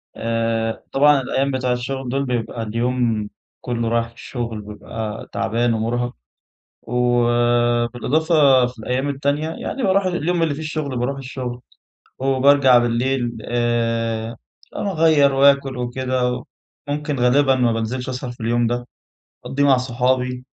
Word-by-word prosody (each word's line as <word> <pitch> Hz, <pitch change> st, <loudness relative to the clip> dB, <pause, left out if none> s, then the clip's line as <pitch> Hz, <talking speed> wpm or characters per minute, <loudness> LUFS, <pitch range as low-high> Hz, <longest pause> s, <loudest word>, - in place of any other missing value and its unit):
آآ، 115 Hz, 0 st, -1 dB
طبعًا 145 Hz, 0 st, +4 dB
الأيّام 135 Hz, +2 st, -1 dB
بتاع 130 Hz, -1 st, -1 dB
الشغل 130 Hz, +1 st, -4 dB
دول 135 Hz, +2 st, -1 dB
بيبقى 120 Hz, -2 st, -3 dB
اليوم 115 Hz, -1 st, -1 dB, 0.3 s
كلّه 115 Hz, -2 st, -2 dB
راح 115 Hz, 0 st, 0 dB
الشغل 115 Hz, -2 st, -5 dB
ببقى 105 Hz, +1 st, -7 dB
تعبان 115 Hz, +1 st, 0 dB
ومرهق. 120 Hz, +2 st, -1 dB, 0.7 s
وبالإضافة 120 Hz, +4 st, +2 dB
في 125 Hz, 0 st, -9 dB
الأيّام 125 Hz, +5 st, -2 dB
التانية 140 Hz, +2 st, -1 dB
يعني 260 Hz, +10 st, -5 dB
باروح 195 Hz, -1 st, +2 dB
اليوم 175 Hz, -1 st, 0 dB
اللي 160 Hz, -3 st, +1 dB
فيه 145 Hz, -, -7 dB
الشغل 155 Hz, -3 st, -3 dB
باروح 130 Hz, +3 st, -1 dB
الشغل، 125 Hz, -2 st, -6 dB, 0.6 s
وبارجع 135 Hz, 0 st, +5 dB
بالليل 120 Hz, +2 st, +1 dB
ب 115 Hz, -2 st, -7 dB
آآ، 115 Hz, -1 st, -1 dB, 0.4 s
أغير 160 Hz, -7 st, +3 dB
وآكل 140 Hz, -1 st, +3 dB
وكده، 125 Hz, 0 st, -1 dB, 0.4 s
ممكن 145 Hz, -1 st, -2 dB
غالبًا 135 Hz, +2 st, +4 dB
ما 125 Hz, -2 st, +2 dB
بنزلش 120 Hz, +4 st, -3 dB
أسهر 125 Hz, -1 st, -4 dB
في 120 Hz, -, -14 dB
اليوم 120 Hz, +1 st, +1 dB
ده، 120 Hz, +1 st, -2 dB, 0.6 s
أقضيه 140 Hz, +1 st, -1 dB
مع 135 Hz, -2 st, +5 dB
صحابي، 125 Hz, 0 st, -1 dB
125 Hz, 130 wpm, -21 LUFS, 120-135 Hz, 0.7 s, وبارجع